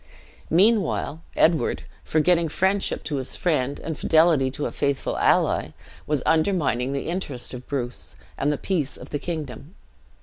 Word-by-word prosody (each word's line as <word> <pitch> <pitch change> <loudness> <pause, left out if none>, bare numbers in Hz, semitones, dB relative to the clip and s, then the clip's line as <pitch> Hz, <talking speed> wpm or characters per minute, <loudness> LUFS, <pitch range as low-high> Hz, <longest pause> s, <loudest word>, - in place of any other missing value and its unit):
"Meanwhile 185 -4 +2
Edward, 160 -1 +2 0.2
forgetting 165 +1 +2
friendship 190 +5 0
to 145 - -2
his 130 -1 -2
friend, 145 -5 0
and 160 - -4
fidelity 160 -4 +4
to 140 +3 -4
a - - -2
faithful 140 -2 -1
ally, - - +2 0.3
was 150 -3 0
undermining 155 -7 +2
the 140 0 -3
interest 170 -9 -3
of 125 0 -8
Bruce, 125 -3 -4 0.2
and 145 - 0
the 145 - -1
peace 155 -6 -1
of - - -11
the 145 - -2
kingdom. 155 - -6
155 Hz, 145 wpm, -24 LUFS, 140-170 Hz, 0.3 s, fidelity